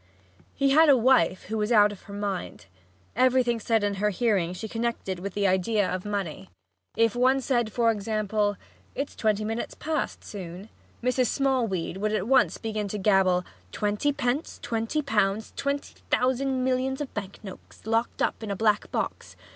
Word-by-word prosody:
He 275 Hz, 0 st, +2 dB
had 315 Hz, +2 st, +6 dB
a 275 Hz, -, +7 dB
wife 250 Hz, -5 st, +3 dB
who 220 Hz, +2 st, -3 dB
was 210 Hz, +2 st, -1 dB
out 210 Hz, -2 st, +6 dB
of 205 Hz, -, -10 dB
her -, -, -7 dB
mind. 200 Hz, -, -4 dB, 0.5 s
Everything 255 Hz, -2 st, +3 dB
said 225 Hz, -1 st, +1 dB
in 205 Hz, 0 st, +1 dB
her 210 Hz, -, +3 dB
hearing 200 Hz, -5 st, +1 dB
she 185 Hz, +5 st, -6 dB
connected 225 Hz, -5 st, -3 dB
with 195 Hz, +1 st, -6 dB
the 205 Hz, -1 st, +1 dB
idea 190 Hz, +2 st, +2 dB
of 185 Hz, +1 st, -3 dB
money. 190 Hz, -, -4 dB, 0.5 s
If 230 Hz, -1 st, +3 dB
one 260 Hz, +2 st, +3 dB
said, 240 Hz, -4 st, 0 dB
for 230 Hz, 0 st, +3 dB
example, 210 Hz, -1 st, -1 dB, 0.4 s
"It's 280 Hz, +1 st, -4 dB
twenty 215 Hz, -1 st, 0 dB
minutes 225 Hz, +2 st, -3 dB
past 310 Hz, -1 st, -3 dB
noon," 185 Hz, +1 st, -8 dB, 0.3 s
Mrs. 250 Hz, 0 st, +2 dB
Smallweed 230 Hz, -12 st, 0 dB
would 210 Hz, +2 st, -1 dB
at 210 Hz, -1 st, -1 dB
once 265 Hz, +1 st, +4 dB
begin 215 Hz, -2 st, -3 dB
to 210 Hz, -, -4 dB
gabble: 190 Hz, -3 st, +3 dB, 0.3 s
"Twenty 210 Hz, -, 0 dB
pence! 275 Hz, +2 st, -2 dB
Twenty 230 Hz, +7 st, -1 dB
pounds! 210 Hz, -4 st, 0 dB
Twenty 280 Hz, 0 st, -2 dB, 0.2 s
thousand 260 Hz, +1 st, +1 dB
millions 260 Hz, +1 st, 0 dB
of 290 Hz, -3 st, -5 dB
bank 200 Hz, -2 st, -5 dB
notes 190 Hz, 0 st, -12 dB
locked 225 Hz, +1 st, 0 dB
up -, -, -1 dB
in 220 Hz, -, -5 dB
a 200 Hz, -, -1 dB
black 210 Hz, 0 st, +1 dB
box!" -, -, -3 dB
220 Hz, 170 wpm, -26 LUFS, 200-255 Hz, 0.5 s, a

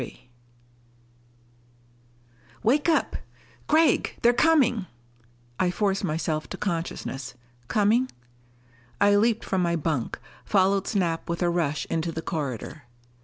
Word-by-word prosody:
XXXIII 125 Hz, -, -10 dB, 2.3 s
"Wake 285 Hz, +9 st, +3 dB
up. 325 Hz, -, +1 dB, 0.5 s
Gregg! 315 Hz, +1 st, +3 dB
They're 240 Hz, +1 st, +6 dB
coming!" 245 Hz, -, +3 dB, 0.7 s
I 185 Hz, -, +2 dB
forced 195 Hz, +1 st, 0 dB
myself 155 Hz, 0 st, -2 dB
to -, -, -6 dB
consciousness. 165 Hz, -8 st, -4 dB, 0.3 s
"Coming 220 Hz, -, +2 dB, 0.5 s
" 120 Hz, 0 st, -31 dB
I 205 Hz, 0 st, +5 dB
leaped 225 Hz, +2 st, +2 dB
from 190 Hz, -, 0 dB
my 170 Hz, -1 st, +1 dB
bunk, 150 Hz, -6 st, -2 dB, 0.3 s
followed 195 Hz, 0 st, +2 dB
Snap 170 Hz, -6 st, -1 dB
with 170 Hz, +1 st, -1 dB
a 175 Hz, -, +2 dB
rush 155 Hz, -4 st, -1 dB
into 165 Hz, +1 st, -2 dB
the 160 Hz, 0 st, -5 dB
corridor. 140 Hz, -2 st, -4 dB
180 Hz, 120 wpm, -26 LUFS, 155-215 Hz, 2.3 s, They're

